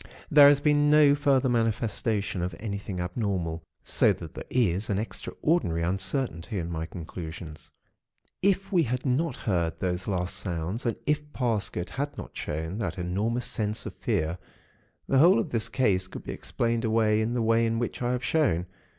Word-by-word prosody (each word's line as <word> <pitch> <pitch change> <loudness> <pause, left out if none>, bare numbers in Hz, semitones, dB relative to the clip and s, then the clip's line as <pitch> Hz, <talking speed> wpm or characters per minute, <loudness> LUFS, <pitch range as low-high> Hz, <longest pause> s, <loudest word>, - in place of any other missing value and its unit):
There 145 -1 +9
has 145 -1 +6
been 145 0 +3
no 150 -1 +6
further 140 -2 +2
manifestation 110 -4 0
of 90 -1 -3
anything 100 -3 -4
abnormal; 90 -3 -2 0.2
so - - +4
that - - -9
there - - -8
is 105 -5 +1
an 100 - +1
extraordinary 105 - -1
uncertainty 95 +2 -2
in 85 -1 -3
my 80 -1 -3
conclusions. 80 -2 -8 0.7
IF 195 0 +1
we 180 -3 +4
had 125 -2 -2
not 135 +2 +1
heard 85 -5 0
those 90 0 -2
last 90 -2 -1
sounds, 90 +6 -3
and 115 - 0
if 150 0 -1
Parsket 110 -7 -1
had 145 +2 -3
not - - -8
shown 80 +7 -4
that 105 - -3
enormous 105 +7 -1
sense 105 -1 -2
of - - -5
fear, 80 +3 -1 0.7
the 135 - +3
whole 175 +7 +7
of 160 - -1
this 115 -1 0
case 100 -7 +1
could - - -9
be - - -5
explained 115 0 -1
away 110 -1 +2
in 115 +2 -1
the 120 - +1
way 115 +1 +3
in 115 0 0
which 120 +1 -3
I 120 0 +1
have 125 0 -2
shown. 135 - +2
110 Hz, 175 wpm, -27 LUFS, 90-130 Hz, 0.7 s, There